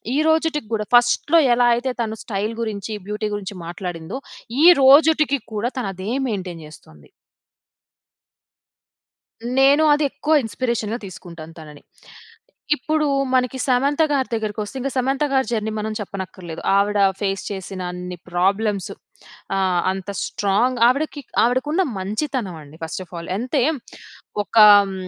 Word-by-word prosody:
ఈరోజుటికి 315 -3 +1
గూడా 210 -1 -1
ఫస్ట్‌లో 245 +7 +3 0.2
ఎలా 245 0 +3
అయితే 250 +2 -2
తను 220 -1 -3
స్టైల్ 215 0 -3
గురించి 215 -1 -4
బ్యూటీ 210 +1 -3
గురించి 200 -1 -6
మాట్లాడిందో, 175 +4 -6 0.5
ఈ - - +10
రోజుటికి 285 +1 +5
కూడా 220 +4 -2
తను 235 - -2
అదే 190 +4 -5 0.2
మెయిన్‌టైన్ 180 -6 -5
చేస్తుంది.‌ 80 - -17 2.5
నేను 280 +3 +5
అది 295 0 0
ఎక్కువ 310 +4 0
ఇన్స్పిరేషన్‌గా 230 -1 -2
తీసుకుంటాను, 170 -3 -10
తనని. 150 -2 -12 0.9
ఇప్పుడు 305 +3 -1 0.3
మనకి 255 0 +1
సమంత 275 +5 +2
గారి 270 -2 0
దగ్గరికొస్తే, 215 +1 -4
ఇంక 275 +2 -2
సమంత 270 +3 +1
గారి, 265 -2 +2
జర్నీ 220 -1 -1
మనం 215 +1 -3
చెప్పనక్కర్లేదు. 185 -4 -7
ఆవిడ 205 +1 +2 0.2
ఫేస్ 195 -1 -1
చేసినన్ని 180 -2 -6
ప్రాబ్లమ్స్ 195 +3 0 0.7
ఆహ్, 185 -2 +1
అంత 190 +1 -5
స్ట్రాంగ్ 220 +6 0
ఆవిడకి 290 +4 0 0.2
ఆవిడకున్న 285 +9 +1 0.2
మంచితనం 210 - -3
అండి. 145 +1 -15
First 160 +3 -5
of 180 - -27
all. 170 0 -7
అంతే, 250 +5 -1 0.8
ఒక 205 - -12 0.3
హ్మ్, 195 -1 -6
215 Hz, 125 wpm, -21 LUFS, 190-260 Hz, 2.5 s, ఈ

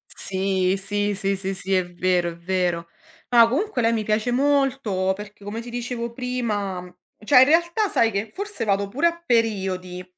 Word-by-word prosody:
Sì, 190 -1 0
sì, 205 +1 -1
sì, 195 0 -1
sì, 195 0 -3
sì, 190 0 -3
è 185 -1 +2
vero, 175 -1 +1
è - - -11
vero. 175 -1 -1 0.4
No, 235 -2 +7
comunque 320 - -1
lei 230 0 +3
mi 220 -1 0
piace 215 +3 0
molto, 265 -8 +1
perché 205 0 -11
come 215 +3 -5
ti 240 - -9
dicevo 235 -1 -4
prima 215 -7 -2 0.4
cioè, 255 +3 +6
in - - +8
realtà 340 +7 +2
sai 230 -1 +3
che 205 +2 -3
forse 405 - -4
vado 200 0 +1
pure 280 +11 -1
a 340 0 -4
periodi. 190 - -1
210 Hz, 175 wpm, -23 LUFS, 190-245 Hz, 0.4 s, in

